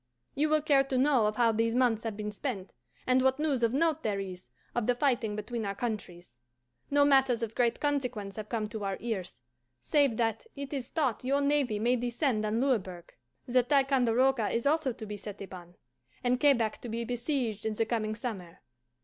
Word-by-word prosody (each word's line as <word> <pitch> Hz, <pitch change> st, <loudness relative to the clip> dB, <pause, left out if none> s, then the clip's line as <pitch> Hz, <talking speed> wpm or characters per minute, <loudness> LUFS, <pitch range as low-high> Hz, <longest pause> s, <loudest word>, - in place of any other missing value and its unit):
You 300 Hz, +2 st, +1 dB
will 310 Hz, -1 st, +2 dB
care 285 Hz, -3 st, +4 dB
to 270 Hz, -1 st, -1 dB
know 260 Hz, -4 st, +4 dB
of 210 Hz, -, -1 dB
how 235 Hz, -1 st, +4 dB
these 225 Hz, +1 st, 0 dB
months 245 Hz, -3 st, +2 dB
have 225 Hz, -3 st, -4 dB
been 210 Hz, 0 st, -4 dB
spent, 210 Hz, -4 st, -5 dB, 0.3 s
and 255 Hz, 0 st, +3 dB
what 265 Hz, 0 st, +3 dB
news 295 Hz, -5 st, 0 dB
of 230 Hz, -1 st, +3 dB
note 320 Hz, +3 st, +1 dB
there 205 Hz, -6 st, -1 dB
is 185 Hz, -2 st, -7 dB, 0.2 s
of 240 Hz, -, -1 dB
the 245 Hz, -, +3 dB
fighting 240 Hz, -5 st, +1 dB
between 220 Hz, +2 st, -4 dB
our 200 Hz, -1 st, -3 dB
countries. 195 Hz, -, -5 dB, 0.6 s
No 285 Hz, 0 st, +4 dB
matters 265 Hz, -4 st, +3 dB
of 225 Hz, -1 st, -3 dB
great 235 Hz, -1 st, +1 dB
consequence 250 Hz, -9 st, -2 dB
have 215 Hz, -1 st, -7 dB
come 220 Hz, -3 st, -1 dB
to 220 Hz, -2 st, -5 dB
our 195 Hz, -1 st, -2 dB
ears, 205 Hz, -, -4 dB, 0.4 s
save 275 Hz, -, +2 dB
that 225 Hz, -, -1 dB
it 280 Hz, 0 st, -6 dB
is 265 Hz, -3 st, -4 dB
thought 265 Hz, -9 st, -1 dB
your 275 Hz, +2 st, +1 dB
navy 280 Hz, -6 st, +1 dB
may 240 Hz, +4 st, +2 dB
descend 240 Hz, -2 st, 0 dB
on 220 Hz, +2 st, 0 dB
Louisburg; 190 Hz, -10 st, -1 dB, 0.3 s
that 250 Hz, 0 st, +2 dB
Ticonderoga 265 Hz, -4 st, +3 dB
is 235 Hz, -, -1 dB
also 300 Hz, -2 st, +2 dB
to 225 Hz, -, -8 dB
be 210 Hz, 0 st, -6 dB
set 205 Hz, 0 st, -8 dB
upon, 180 Hz, -3 st, -10 dB, 0.5 s
and 250 Hz, 0 st, +2 dB
Quebec 240 Hz, -7 st, +2 dB
to 240 Hz, -, -7 dB
be 230 Hz, +1 st, -2 dB
besieged 240 Hz, -3 st, -2 dB
in 220 Hz, -, -1 dB
the 225 Hz, -, +1 dB
coming 215 Hz, -2 st, -1 dB
summer. 205 Hz, -8 st, -6 dB
235 Hz, 200 wpm, -30 LUFS, 215-270 Hz, 0.6 s, care